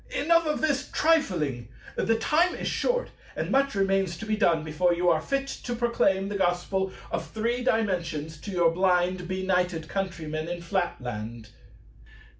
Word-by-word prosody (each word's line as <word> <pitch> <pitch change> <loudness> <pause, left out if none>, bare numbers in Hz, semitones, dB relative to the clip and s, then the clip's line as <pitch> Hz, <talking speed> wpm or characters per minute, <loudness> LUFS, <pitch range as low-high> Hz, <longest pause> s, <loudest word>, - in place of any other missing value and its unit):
Enough 335 +1 +2
of 300 - -1
this 280 -3 0
trifling! 175 - +1 0.3
The 225 0 +1
time 320 +10 +2
is - - -4
short, - - 0 0.2
and - - -3
much 275 -2 +2
remains 195 -3 +1
to 225 - -7
be 215 -1 0
done 170 -7 +2
before 175 +3 +1
you 175 +1 +2
are 160 -1 +2
fit 275 +8 -1
to 245 -2 -5
proclaim 215 -5 +1
the 205 0 -3
Gospel 190 +1 0 0.2
of 165 -1 -2
Three 235 +3 -1
Dimensions 170 - -1
to 205 - -8
your 175 -3 +3
blind 180 0 +1
benighted 180 -3 0
countrymen 160 -5 -3
in 175 0 -5
Flatland. 120 - -3
185 Hz, 155 wpm, -27 LUFS, 170-225 Hz, 0.3 s, your